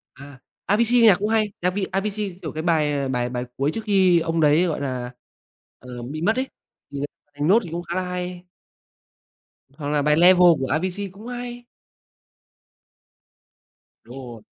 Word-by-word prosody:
À, 140 -1 -13 0.3
Avicii 235 +4 +3
nhạc 215 -5 +7
cũng 205 +1 -1
hay, 215 -2 +1
Avi 185 +3 0
Avicii, 195 -1 -2
kiểu, 155 - -5
cái 155 - -4
bài 150 -5 +1
bài 125 -2 -1
bài 125 0 -4
cuối 140 +2 +1
trước - - -3
khi 190 -5 +4
ông 165 0 -1
đấy, 155 +3 +4
gọi 160 -5 -2
là, 130 -3 -3 0.7
ờ, 125 -1 -9
bị 140 +6 -6
mất 220 +6 +2
ấy, 260 +1 0 0.4
thì 140 - -6 0.3
bài 145 0 -19
"Note" 220 +4 +4
thì 170 - -8
cũng 170 +1 -3
khá 175 +1 -5
là 185 - 0
hay. 180 0 -5 1.3
Hoặc 145 -2 -5
là 150 -1 +1
bài 150 +1 +3
"Levels" 175 -1 +6
của 130 - -1
Avicii 185 +7 -2
cũng 205 +4 -13
hay. 245 0 -7 2.4
Đúng 120 +3 -12
rồi. 120 -4 -10
175 Hz, 170 wpm, -23 LUFS, 145-200 Hz, 2.4 s, nhạc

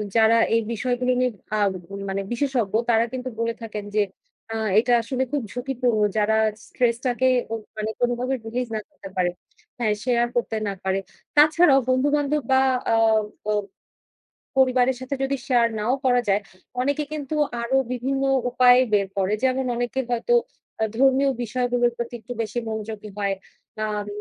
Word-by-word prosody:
যারা 225 0 +5 0.2
এই 230 - +3
বিষয়গুলো 250 +2 0
নিয়ে 250 0 +2 0.3
আ - - 0 0.5
মানে 195 +1 -1
বিশেষজ্ঞ 240 -5 0 0.2
তারা 230 0 +4
কিন্তু 255 0 -4
বলে 230 0 0
থাকেন, 215 -2 -5
যে 215 - +4 0.5
আ - - -3 0.2
এটা 245 +2 +2
আসলে 255 +3 -1
খুব 290 -1 0
ঝুঁকিপূর্ণ। 245 -2 0 0.2
যারা 215 +1 +3 0.3
stress 235 -2 0
টাকে 250 +1 +2 0.2
অ - - -1 0.2
মানে 215 0 -2
কোনোভাবে 245 +2 0
release 240 +2 -3
না - - -1
করতে 195 - -11
পারে। 180 -1 +2 0.5
হ্যাঁ 220 -3 +2
শেয়ার 240 -1 +2
করতে 240 -2 0
না 200 - -1
পারে। 190 0 0 0.4
তাছাড়াও 300 -1 +6
বন্ধু 255 +2 +3
বান্ধব, 295 0 0
বা 265 - +6 0.3
আ - - +5 0.5
ব - - -8 1.1
পরিবারের 260 -1 +4
সাথে 260 +2 -3
যদি 270 +1 0
শেয়ার 240 -3 +4
নাও 220 +4 +1
করা 245 -1 +4
যায় 200 +1 +3 0.4
অনেকে 285 +3 0
কিন্তু 300 0 -4 0.3
আরো 235 +3 0 0.2
বিভিন্ন 265 +2 -1 0.3
উপায় 250 0 +6
বের 200 -1 +3
করে। 195 +1 +1
যেমন 260 0 +2
অনেকে 245 +2 -2
হয়তো 240 - 0 0.5
আ - - +4
ধর্মীয় 270 +2 +4
বিষয়গুলোর 245 +1 +1
প্রতি 235 0 -4
একটু 245 +2 -7
বেশি 225 +2 -2
মনোযোগী 220 -1 -5
হয়। 200 -1 0 0.5
আম 210 -1 -3
245 Hz, 160 wpm, -24 LUFS, 220-260 Hz, 1.1 s, তাছাড়াও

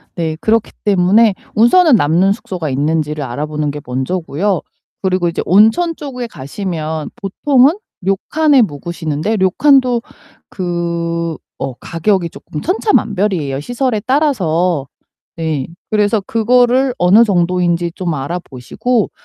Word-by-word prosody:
네, 160 -2 -2
그렇기 225 0 +1
때문에 200 +2 +4 0.2
우선은 280 +6 +5
남는 175 +5 +2
숙소가 180 -7 -4
있는지를 150 +2 -1
알아보는 150 +4 -3
게 145 0 -7
먼저고요. 160 +8 -2 0.4
그리고 185 -2 +1
이제 170 - -2
온천 225 - +4
쪽에 250 -4 -6
가시면 155 -1 -5
보통은 270 - +2 0.2
료칸에 270 - +2
묵으시는데 160 +2 -2
료칸도 250 +5 +3 0.5
그 170 -3 -3 0.3
어 135 -2 -4
가격이 175 - -1
쪼끔 150 - -8
천차만별이에요 200 - 0
시설에 245 - -1
따라서. 180 - +1 0.5
네. 155 -5 -2 0.2
그래서 210 0 +2
그거를 245 +4 +2
어느 195 +6 +5
정도인지 175 -3 +1
좀 175 -3 -2
알아보시고. 170 - -2
185 Hz, 290 characters per minute, -16 LUFS, 160-230 Hz, 0.5 s, 우선은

